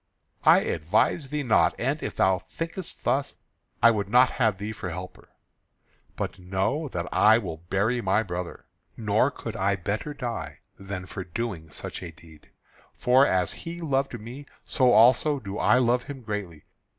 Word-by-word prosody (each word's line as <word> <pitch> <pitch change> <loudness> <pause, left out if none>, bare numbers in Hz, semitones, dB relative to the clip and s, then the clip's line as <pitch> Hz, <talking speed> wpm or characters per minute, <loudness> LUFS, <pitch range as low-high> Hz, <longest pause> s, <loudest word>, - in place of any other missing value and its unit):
"I - - +7
advise 105 - 0
thee 150 0 -2
not, 115 -4 +3
and, 140 +5 -1
if - - -4
thou 95 -1 +3
thinkest 165 - -6
thus, 140 +1 0 0.5
I 115 - +8
would 100 -3 -2
not 125 +3 +5
have 110 -6 +1
thee 105 +2 -5
for 95 -4 -6
helper. 90 +2 -8 0.9
But - - -4
know 95 - -1
that 90 -9 -4
I 110 +1 +6
will 90 -8 -4
bury 110 +5 +1
my 100 +2 +2
brother, 90 -3 -6 0.3
nor 110 +3 +2
could 115 -5 -7
I 100 +1 +1
better 105 - -4
die 120 -4 -5 0.2
than 95 -1 -6
for 95 +1 -6
doing 90 -3 -5
such - - -7
a 90 - -6
deed. 80 -1 -17 0.4
For 130 +3 +4
as 90 -2 +1
he 170 +1 -8
loved 135 -6 -1
me, 125 +7 -9 0.2
so 130 -4 +3
also 125 +6 +5
do 100 -4 -6
I - - +4
love 125 0 +2
him 135 -3 -8
greatly. 100 -8 -5
110 Hz, 165 wpm, -26 LUFS, 95-130 Hz, 0.9 s, I